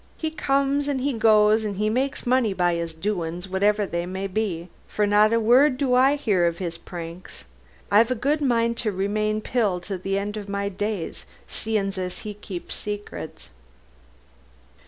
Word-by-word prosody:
He 315 -1 -2
comes 280 -1 +1
and 280 -2 0
he 280 +1 0
goes 215 -1 +4
and 205 -2 -4
makes 265 +3 -1
money 245 -4 +2
by 175 -2 +2
'is 170 -1 -3
doin's, 175 -1 -3
whatever 205 +2 +2
they 170 -2 -3
may 190 +1 -4
be. 185 -4 -2 0.2
For 210 - 0
not 210 +1 +4
a 230 - +3
word 255 +5 +5
do 265 -3 +1
I 270 +3 +4
'ear 185 -6 +3
of 170 - -3
'is 170 -3 -3
pranks. 170 +1 -9 0.5
I've 220 +4 +5
a 255 - +1
good 290 +6 0
mind 235 -3 +1
to 220 -4 0
remain 215 +2 -1
Pill 215 -7 0
to 190 +1 -5
the 195 +2 -1
end 205 +2 -3
of 205 -1 -7
my 200 0 -1
days, 200 -2 -4 0.2
seein' 210 -3 -2
as 180 -1 -3
he 210 - -4
keeps 195 -3 -7
secrets." 205 - -6
210 Hz, 175 wpm, -24 LUFS, 190-235 Hz, 0.5 s, word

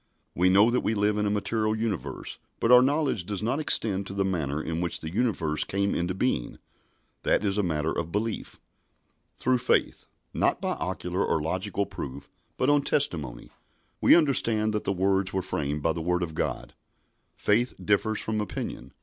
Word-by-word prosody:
We 90 +2 +3
know 100 +5 +5
that 125 - +2
we 110 - -1
live 105 0 +1
in 105 - +1
a - - +1
material 110 +1 0
universe, 110 -4 -4 0.2
but 115 - +2
our 125 0 +9
knowledge 140 - +1
does 100 +2 -4
not 125 +6 0
extend 100 -9 +1
to - - -6
the 100 -1 +1
manner 80 -6 -1
in 80 +1 -3
which 85 - 0
the 80 +1 -7
universe 90 -10 0
came 100 +1 -1
into 90 +2 -1
being. 95 - -1 0.6
That 105 - +1
is 100 +1 +1
a - - +4
matter 80 -4 -1
of 85 0 -3
belief. 105 +3 -3 0.8
"Through 130 0 +1
faith" - - 0 0.3
not - - +2
by - - -2
ocular 90 +2 -2
or - - +1
logical 95 +6 -2
proof, 70 -8 -8 0.3
but 130 - +1
on 145 0 +4
testimony 85 - -1 0.5
"we - - +7
understand 115 -9 +3
that 105 - -2
the - - +1
worlds 95 0 +1
were 95 -1 -1
framed 75 -4 -2
by 80 - +2
the 85 - -4
Word 90 +2 0
of 80 -2 -4
God." - - -3 0.6
Faith 120 +4 +1
differs 105 +1 +1
from 110 -1 -2
opinion. 105 - -6
100 Hz, 185 wpm, -27 LUFS, 85-110 Hz, 0.8 s, our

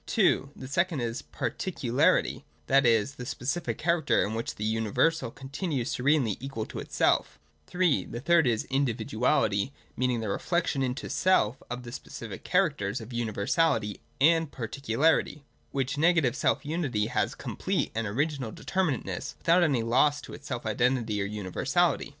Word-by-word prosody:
(2) 185 - +2
The 130 - -8
second 170 +1 0
is 120 0 -2
Parti 190 - -4
cularity 125 -7 +2
— 75 0 -37
that 135 -1 +4
is, 115 +3 +3
the 125 - -6
specific 145 +6 -2
character, 170 0 +2
in 105 - -3
which 115 +1 -3
the 105 - -5
uni 110 0 0
versal 160 +2 +2
continues 135 -1 -3
serenely 130 -5 +2
equal 135 -4 -4
to - - -7
itself - - +1 0.3
(3) 180 -5 +1
The 120 - -6
third 165 +1 +4
is 115 -2 +1
Individuality 120 -3 0
— - - -33
meaning 125 -2 0
the 110 - -3
reflection 165 - 0
into 130 0 -2
self 135 - +2
of 125 +1 -5
the 120 - -8
specific 115 -4 -8
characters 145 - +1
of 115 +2 -9
universality 110 - 0 0.2
and 160 +1 +4
particularity; 140 +4 0
— - - -39
which 135 +1 -2
negative 160 -6 +4
selfunity 145 -9 0
has - - 0
complete - - -2
and 115 0 -2
original 135 +1 -1
determinateness, 180 -5 -2
without 170 +2 +3
any 140 -9 +2
loss 135 +6 +3
to - - -10
its 145 - -10
self 125 -4 -4
identity 115 -1 +1
or - - 0
universality. 105 - 0
130 Hz, 160 wpm, -28 LUFS, 115-155 Hz, 0.3 s, that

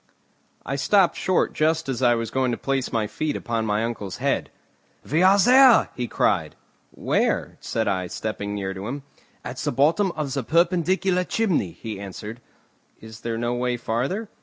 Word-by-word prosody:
I 140 - -2
stopped 185 +6 +3
short 185 -1 +1
just 160 +1 +1
as 130 -3 -3
I 120 -2 +4
was 115 -1 -3
going 130 -1 +1
to 120 - -1
place 135 -1 -2
my 115 -3 0
feet 145 +8 -3
upon 115 -1 -2
my 105 +1 0
uncle's 110 -5 -4
head. - - -1 0.6
"We 155 +4 +1
are 190 +2 +6
there," 250 +2 +6
he 125 -1 -3
cried. - - 0 0.3
"Where?" - - -1
said - - -2
I, 95 -1 -1
stepping 105 +1 -4
near 95 -1 -3
to 95 +2 -6
him. 140 +3 -5 0.4
"At - - -6
the - - -2
bottom 160 - +2
of 150 -4 -3
the 140 - -1
perpendicular 180 - +1
chimney," 180 - 0
he 110 -3 -7
answered. 105 +4 -8 0.6
"Is 110 0 -12
there 115 -1 -3
no 120 +1 -1
way 125 0 -1
farther?" 130 - -2
125 Hz, 175 wpm, -24 LUFS, 110-170 Hz, 0.6 s, are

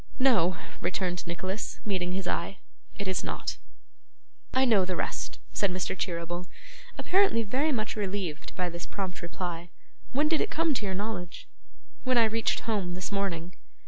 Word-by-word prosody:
'No!' 195 -10 +5 0.2
returned 180 -1 0
Nicholas, 185 +4 -3
meeting 185 -3 0
his 190 -1 -1
eye, 180 +3 -1 0.4
'it 200 - -3
is 190 -1 +1
not.' - - -2 0.9
'I 260 +1 +4
know 215 -6 +6
the 185 0 -1
rest,' - - -2 0.2
said 200 - +3
Mr. 185 0 -1
Cheeryble, 175 -1 -2 0.5
apparently 370 -12 +4
very 265 +9 +2
much 215 -5 0
relieved 190 -6 -2
by 180 -1 +1
this 170 0 -5
prompt 190 -2 -3
reply. 175 0 -4 0.4
'When 290 +4 +3
did 320 0 +3
it - - +1
come 325 0 +2
to 225 - -1
your 190 - 0
knowledge?' 195 -4 -3 0.6
'When 255 -1 +3
I 230 - +7
reached 225 +1 +1
home 200 -6 0
this 185 +2 -3
morning. 180 -4 -1
190 Hz, 160 wpm, -30 LUFS, 180-225 Hz, 0.9 s, I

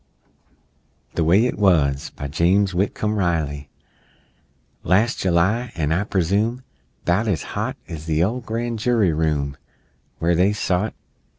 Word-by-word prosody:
THE 85 - 0
WAY 95 +9 +4
IT 125 - -2
WUZ 75 -9 +2
BY 70 - -5
JAMES 95 +6 +2
WHITCOMB 105 +3 -1
RILEY 75 -6 -1 1.1
Las' 105 +8 +2
July 95 +7 +1
an', 75 -2 -1
I 90 +5 +1
presume 105 +7 0 0.4
'Bout 95 +6 +1
as 90 -8 0
hot - - -2
As 80 -1 -8
the 80 +1 +2
ole 115 +7 0
Gran' 115 0 -3
Jury 110 -6 +2
room 75 -3 -1 0.6
Where 85 +2 +1
they 95 +5 +3
sot! 100 0 -1
90 Hz, 130 wpm, -22 LUFS, 80-105 Hz, 1.1 s, WAY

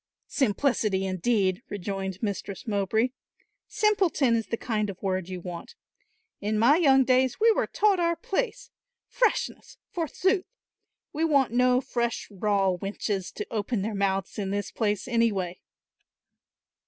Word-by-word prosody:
"'Simplicity,' 215 -5 +1
indeed," 190 0 +1
rejoined 195 -1 -4
Mistress 200 -2 -4
Mowbray, 220 +3 +1 0.6
"simpleton 370 - +2
is 225 -1 -1
the 230 - -2
kind 215 -4 -1
of 190 - -7
word 185 -2 -2
you 185 -1 -5
want. 175 -1 -8 0.6
In 210 +1 -1
my 245 +8 +5
young 270 -6 +5
days 255 0 +2
we 455 +1 +6
were - - +1
taught 405 -3 +2
our 340 0 +2
place; 485 +8 -3 0.3
'freshness,' 475 -3 -1
forsooth! 370 +4 0 0.7
We 315 +2 -1
want 280 -6 +3
no 250 +1 +3
fresh 235 -3 -2
raw 195 -1 +1
wenches 195 0 -3
to 210 - -4
open 215 -1 -1
their 220 +1 -2
mouths 195 0 -1
in 195 -2 -2
this 200 0 -2
place, 205 -2 -1
anyway." 210 -7 0
220 Hz, 135 wpm, -27 LUFS, 195-270 Hz, 0.7 s, we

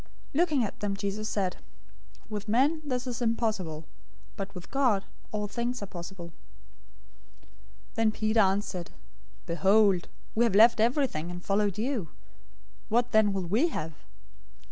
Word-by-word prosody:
019:026 285 - 0
Looking 310 -7 +3
at 210 - -4
them, 200 -1 -2
Jesus 200 +2 -3
said, 190 -3 -1 0.7
"With 210 -1 -5
men 280 +8 +3
this 255 -3 -2
is 245 -1 -4
impossible, 215 -9 -1 0.5
but 195 0 -6
with 180 - -9
God 250 -8 +2 0.3
all 210 -1 -2
things 240 +2 -3
are - - -2
possible." 175 -2 -8 1.6
019:027 - - -31
Then 225 -2 +2
Peter 215 +1 +1
answered, 190 -3 +1 0.5
"Behold, 195 +1 +3 0.3
we 230 - +3
have 230 -5 +2
left 225 +2 +7
everything, 230 - +1
and 175 0 -7
followed 200 0 +1
you. 225 - -1 0.8
What 240 +2 +2
then 220 -2 +5
will 190 -2 -2
we 220 - +2
have?" 160 - -4
210 Hz, 145 wpm, -29 LUFS, 195-235 Hz, 1.6 s, left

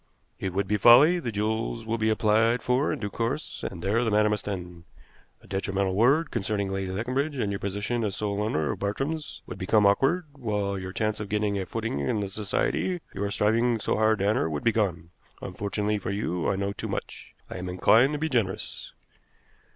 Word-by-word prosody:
"It 95 - -2
would 100 +1 0
be 105 +2 +1
folly. 135 - +7
The 120 -8 -3
jewels 110 +2 -2
will 115 +1 -2
be 110 0 +2
applied 110 +2 +2
for 125 +3 +1
in - - -2
due 105 -3 -4
course, 120 +9 -3
and 85 -3 -9
there 110 +5 +2
the 115 - +1
matter 105 0 +3
must 105 -1 -2
end. 90 -4 -6 0.6
A - - -17
detrimental 95 -1 -1
word 135 - +3
concerning 100 -3 -1
Lady 95 -1 -2
Leconbridge, 130 +8 -2
and 105 -5 -1
your 100 - -3
position 105 +4 -2
as 100 -3 -1
sole 105 -1 -2
owner 80 -8 0
of - - -5
Bartrams 140 +9 -3
would - - -8
become 105 +3 +3
awkward, 135 - +3
while 105 -6 -2
your 95 0 -6
chance 110 +2 -1
of 105 -2 -5
getting 105 -1 0
a 95 - -4
footing 115 -9 -3
in 70 +10 0
the 100 -1 -3
society 110 - -1
you 95 - -3
are 100 - -1
striving 115 +4 +2
so - - 0
hard 110 0 +3
to 100 - 0
enter 105 -6 +1
would 75 -2 -3
be 115 - +4
gone. 90 -7 -1 0.3
Unfortunately 105 +1 -2
for 95 - -5
you, 95 -4 -1
I - - +1
know 100 +1 -2
too - - -5
much. - - -6
I - - -7
am 90 0 -5
inclined 115 +9 +4
to - - -1
be 160 +2 -1
generous." 115 -10 -2
105 Hz, 210 wpm, -27 LUFS, 100-115 Hz, 0.6 s, folly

